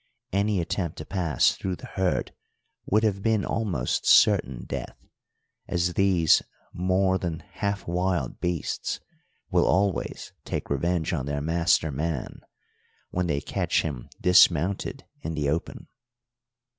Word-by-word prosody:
Any 100 0 +1
attempt 85 -1 -2
to 80 - -6
pass 85 -8 +2
through 95 -1 -3
the - - -11
herd 95 -2 -1 0.5
would 110 +3 +3
have 100 -3 +1
been 110 -2 +1
almost 95 - -1
certain 65 -2 +5
death, - - -5 0.7
as 90 0 0
these 90 -5 +4 0.3
more 95 +1 +1
than 85 -2 -3
half 100 -2 -3
wild 90 -5 -1
beasts 90 -3 -2 0.5
will - - +3
always 95 +1 0
take - - -4
revenge 85 +4 0
on 70 -5 -2
their 70 0 -1
master 80 0 +2
man 75 0 -3 0.7
when 90 0 -1
they 70 -3 0
catch - - 0
him 70 -6 -5
dismounted 90 0 +3 0.2
in 80 +1 -4
the 75 -2 0
open. 80 +4 -3
90 Hz, 130 wpm, -26 LUFS, 80-95 Hz, 0.7 s, certain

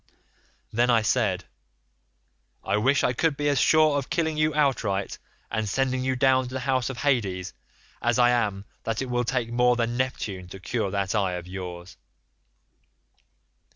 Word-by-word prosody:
"Then 120 +3 +2
I 115 -2 +4
said, 105 -6 +1 1.2
'I - - 0
wish 135 +7 +2
I 125 - +2
could 150 +3 0
be 145 - -1
as 140 -2 +2
sure 155 -2 +4
of 135 - -7
killing 160 -2 0
you 155 0 +2
outright 125 -10 0 0.3
and 110 -1 -1
sending 130 +2 0
you 130 0 0
down 130 0 +3
to 125 - -9
the 130 - -2
house 130 -1 0
of 135 - -6
Hades, 100 -10 0 0.5
as 120 0 +1
I 120 0 +5
am 105 -5 0 0.2
that 115 +3 -2
it 130 - -6
will 120 0 +1
take 120 -1 -1
more 125 +1 +3
than 120 0 -1
Neptune 105 -8 -3
to 95 +2 -10
cure 110 +1 -2
that 100 -1 -1
eye 100 -4 +1
of 90 -1 -5
yours. 90 -1 -8
120 Hz, 170 wpm, -26 LUFS, 100-130 Hz, 1.2 s, I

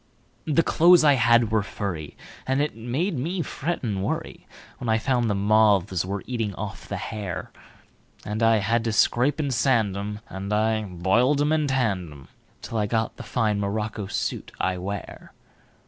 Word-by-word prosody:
The 160 +2 +3
clothes 170 +1 +5
I 145 -2 +6
had 115 -2 +4
were 110 -1 +3
furry, 90 -6 -5 0.3
And 130 +1 +1
it 145 -3 -1
made 130 - -2
me 170 +6 -2
fret 165 +3 -3
and 105 -5 -1
worryWhen 95 - -4 0.4
I 110 - +4
found 120 0 0
the 105 - +1
moths 100 -3 +3
were 100 +1 -4
eating 115 -6 -3
off - - -7
the - - -4
hair; 105 -5 -5 0.7
And 105 +1 -3
I 115 0 +5
had 115 +3 +1
to 115 - 0
scrape 125 +7 +2
and 140 -3 0
sand 115 -6 +2
'em, 105 +1 -5
And 95 +2 -6
I 110 +1 +2
boiled 100 +10 +2
'em 145 +1 +2
and 155 -3 +1
I - - +1
tanned 100 - 0
'em, 70 -2 -13 0.4
Till 115 - -3
I 105 - 0
got 110 +1 -1
the - - -7
fine 110 -4 0
morocco 105 0 -3
suit - - -3
I 95 -1 0
wear. 100 +2 -7
110 Hz, 180 wpm, -25 LUFS, 100-130 Hz, 0.7 s, I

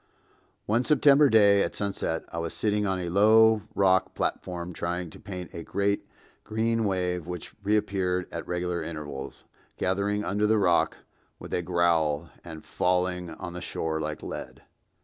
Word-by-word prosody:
One 115 +4 +2
September 145 0 +5
day 100 -3 +6
at - - -1
sunset 100 -5 -2
I 85 - -2
was 85 0 -4
sitting 105 -1 0
on 95 -1 0
a 90 -1 -3
low 110 +3 +5
rock 95 -1 +3
platform 90 -1 -3
trying 85 0 -3
to - - -13
paint 90 -3 -8
a 85 - -6
great 100 +4 -1 0.4
green 115 +1 0
wave 90 -3 -1
which 90 -2 -7
reappeared 95 -3 0
at - - -6
regular 90 0 -2
intervals, 75 -4 -7 0.3
gathering 100 +2 0
under 105 +1 +1
the 110 +1 +3
rock 90 -4 +2 0.4
with - - -9
a - - +1
growl 85 -3 +1
and 80 -2 -10
falling 90 -1 0
on 85 +2 -7
the 90 - -6
shore 80 -1 -3
like 75 0 -4
lead. - - -7
90 Hz, 155 wpm, -27 LUFS, 85-105 Hz, 0.4 s, day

